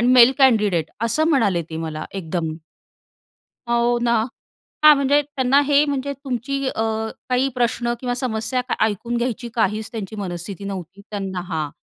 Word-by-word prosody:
Mail 245 Hz, 0 st, +8 dB
candidate," 210 Hz, -, +3 dB, 0.2 s
असं 310 Hz, +7 st, +2 dB
म्हणाले 205 Hz, -, +2 dB
ते 160 Hz, -, -5 dB
मला 155 Hz, 0 st, -5 dB
एकदम. 165 Hz, -3 st, -3 dB, 1.2 s
हो 235 Hz, 0 st, +2 dB
ना. 235 Hz, -1 st, +3 dB, 0.7 s
हां, 305 Hz, 0 st, +9 dB
म्हणजे 280 Hz, +1 st, +3 dB
त्यांना 275 Hz, -2 st, +2 dB
हे, 290 Hz, 0 st, +5 dB
म्हणजे 280 Hz, -1 st, -2 dB
तुमची, 275 Hz, 0 st, -3 dB
अ, -, -, -2 dB, 0.6 s
काही 255 Hz, +1 st, +2 dB
प्रश्न 240 Hz, 0 st, 0 dB
किंवा 250 Hz, -1 st, -2 dB
समस्या 245 Hz, 0 st, -1 dB, 0.2 s
ऐकून 230 Hz, +3 st, -2 dB
घ्यायची 240 Hz, 0 st, -2 dB
काहीच 215 Hz, -1 st, 0 dB
त्यांची 220 Hz, -2 st, -6 dB
मनस्थिती 190 Hz, 0 st, -5 dB
नव्हती. 190 Hz, -1 st, -7 dB
त्यांना 195 Hz, -3 st, -3 dB
हां, 155 Hz, -3 st, -2 dB
235 Hz, 140 wpm, -21 LUFS, 195-260 Hz, 1.2 s, हां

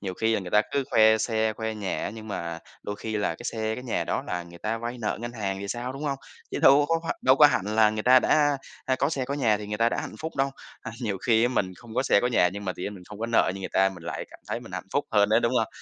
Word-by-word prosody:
Nhiều 95 Hz, -2 st, -4 dB
khi 110 Hz, +2 st, +1 dB
là -, -, 0 dB
người 90 Hz, -2 st, -7 dB
ta 105 Hz, 0 st, +5 dB
cứ 140 Hz, -1 st, +1 dB
khoe 110 Hz, 0 st, +6 dB
xe, 110 Hz, 0 st, 0 dB
khoe 110 Hz, 0 st, -4 dB
nhà 100 Hz, -3 st, -3 dB
á -, -, -3 dB
nhưng 110 Hz, 0 st, -9 dB
mà 85 Hz, -4 st, -4 dB, 0.2 s
đôi 105 Hz, 0 st, -5 dB
khi 110 Hz, 0 st, -4 dB
là 105 Hz, -, 0 dB
cái -, -, -12 dB
xe, 110 Hz, -1 st, -2 dB
cái 125 Hz, -, -8 dB
nhà 120 Hz, -, -1 dB
đó -, -, -1 dB
là 90 Hz, -1 st, -3 dB
người 85 Hz, 0 st, -13 dB
ta 115 Hz, +4 st, -2 dB
vay 120 Hz, +2 st, -5 dB
nợ 110 Hz, -, -2 dB
ngân 120 Hz, 0 st, -5 dB
hàng 100 Hz, -4 st, -3 dB
thì 100 Hz, -, -5 dB
sao, 125 Hz, +4 st, -3 dB
đúng 135 Hz, +2 st, -8 dB
hông? 140 Hz, -2 st, -1 dB, 0.3 s
Chứ -, -, -3 dB
đâu 140 Hz, +2 st, +6 dB
có 165 Hz, -, +3 dB
h -, -, -9 dB, 0.2 s
đâu 130 Hz, +1 st, +5 dB
có 150 Hz, +1 st, +9 dB
hẳn 100 Hz, -9 st, +1 dB
là 110 Hz, 0 st, +4 dB
người 110 Hz, 0 st, -3 dB
ta 130 Hz, +2 st, +7 dB
đã, 145 Hz, -2 st, +3 dB, 0.3 s
a, 130 Hz, 0 st, +1 dB
có 140 Hz, -, +1 dB
xe, 135 Hz, -5 st, -1 dB
có 140 Hz, +2 st, -3 dB
nhà 115 Hz, -7 st, +2 dB
thì 105 Hz, -, -7 dB
người 105 Hz, +1 st, -4 dB
ta 115 Hz, -, +4 dB
đã -, -, -3 dB
hạnh -, -, -7 dB
phúc 160 Hz, +1 st, -6 dB
đâu, 135 Hz, 0 st, +1 dB, 0.3 s
à, -, -, -7 dB
nhiều 105 Hz, -6 st, -2 dB
khi 120 Hz, 0 st, +3 dB
mình 95 Hz, -7 st, -1 dB
không 115 Hz, -2 st, -12 dB
có 130 Hz, -, +2 dB
xe 100 Hz, -, +4 dB
có 125 Hz, -, +1 dB
nhà 110 Hz, -7 st, +3 dB
nhưng 100 Hz, +1 st, -6 dB
mà 95 Hz, -, -1 dB
tự 90 Hz, -, -9 dB
nhiên 105 Hz, -, -4 dB
mình 90 Hz, -2 st, -12 dB
không 105 Hz, -1 st, -10 dB
có 115 Hz, -, -2 dB
nợ 115 Hz, -4 st, +3 dB
như 95 Hz, -, -7 dB
người 95 Hz, -, -4 dB
ta, 95 Hz, 0 st, +4 dB
mình 90 Hz, -3 st, -10 dB
lại 85 Hz, -, -4 dB
cảm -, -, -13 dB
thấy -, -, -2 dB
mình -, -, -12 dB
hạnh -, -, -5 dB
phúc -, -, +1 dB
hơn 100 Hz, -1 st, +4 dB
đấy, 110 Hz, +2 st, +4 dB
đúng 115 Hz, +1 st, +1 dB
hông? 115 Hz, -4 st, +1 dB
110 Hz, 325 wpm, -26 LUFS, 105-125 Hz, 0.3 s, có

